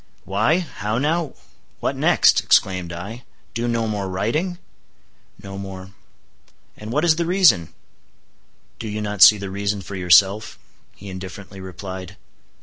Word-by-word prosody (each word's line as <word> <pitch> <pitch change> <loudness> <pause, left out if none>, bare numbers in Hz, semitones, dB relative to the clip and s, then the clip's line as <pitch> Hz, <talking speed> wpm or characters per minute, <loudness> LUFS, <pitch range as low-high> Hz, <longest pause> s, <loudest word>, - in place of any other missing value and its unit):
"Why, 105 - +1
how 110 - -4
now? 155 +2 -1 0.4
what - - -1
next?" - - +4
exclaimed 90 -3 +2
I, 100 +8 -7 0.3
"do 120 +1 -2
no 115 -1 0
more 100 -3 -3
writing?" 150 - -1 0.9
"No 100 0 -7
more." 95 -1 -8 0.8
"And 110 +1 -8
what 150 +6 +1
is 160 -2 +4
the 170 - 0
reason?" 170 - +4 1.1
"Do 115 - -5
you 105 0 -4
not 105 -2 -4
see 105 - +10
the 100 -1 -6
reason 100 0 -2
for 100 - -8
yourself," 95 +3 +3 0.4
he 100 - -12
indifferently 95 +1 -9
replied. 95 +1 -8
100 Hz, 140 wpm, -21 LUFS, 95-115 Hz, 1.1 s, see